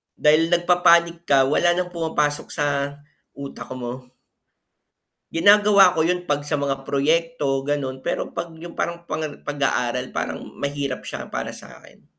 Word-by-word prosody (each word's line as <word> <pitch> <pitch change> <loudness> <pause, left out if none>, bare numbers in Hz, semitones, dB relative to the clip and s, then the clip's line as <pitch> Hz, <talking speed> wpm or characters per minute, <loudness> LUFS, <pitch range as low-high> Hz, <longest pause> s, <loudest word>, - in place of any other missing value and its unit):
Dahil 155 +2 +3
nagpapanik 170 -1 +3
ka 135 -1 +5
wala 175 +6 +2
ng 180 0 -2
pumapasok 160 -3 0
sa 140 -1 0 0.4
utak 135 -3 -8
mo. 125 0 -7 1.3
Ginagawa 200 0 +5
ko 160 - +3
yun 180 +1 -1
'pag 145 0 0
sa 150 - +1
mga 135 -1 -2
proyekto, 145 -1 0
ganun 140 -3 -2
pero - - -2
'pag 170 -1 -6
yung 175 0 -9
parang 170 0 -4
pang 155 +1 -2 0.2
pag-aaral, 130 -4 -1
parang - - -3 0.2
mahirap 140 -2 -3
siya - - -5
para - - -3
sa'kin. - - -10
150 Hz, 140 wpm, -22 LUFS, 140-170 Hz, 1.3 s, ka